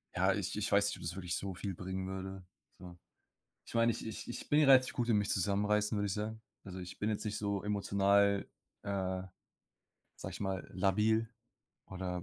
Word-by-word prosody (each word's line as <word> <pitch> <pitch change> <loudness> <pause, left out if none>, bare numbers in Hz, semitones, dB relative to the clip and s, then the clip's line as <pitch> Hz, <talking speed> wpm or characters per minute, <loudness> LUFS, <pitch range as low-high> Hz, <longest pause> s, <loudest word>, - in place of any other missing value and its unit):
Ja, - - +3
ich - - -2
ich - - -1
weiß - - +5
nicht, - - -2
ob - - -11
das 85 +1 -3
wirklich 90 -3 -2
so 95 -1 -3
viel 95 +2 -4
bringen 95 +1 -4
würde, 95 0 -5 0.4
so. 90 -2 -10 0.7
Ich - - -12
meine, 115 0 +4
ich 115 - -4
ich 110 - -6
ich 120 - -6
bin 150 +1 +4
relativ 135 -3 +6
gut 120 -1 -1
in 110 - +4
mich 105 -1 +1
zusammenreißen, 105 +3 +2
würde 105 - 0
ich 100 - -1
sagen. 110 +2 -3 0.2
Also, 95 -1 -7
ich 90 -1 -8
bin 105 - -1
jetzt 105 - -2
nicht 105 0 -2
so 100 -2 -1
emotional, 100 -1 +2 0.3
äh, 95 -2 -2 0.9
sage - - -6
ich - - -7
mal, 95 -2 -2
labil 105 +4 +2 0.6
oder 90 -2 -4
100 Hz, 195 wpm, -34 LUFS, 95-105 Hz, 0.9 s, relativ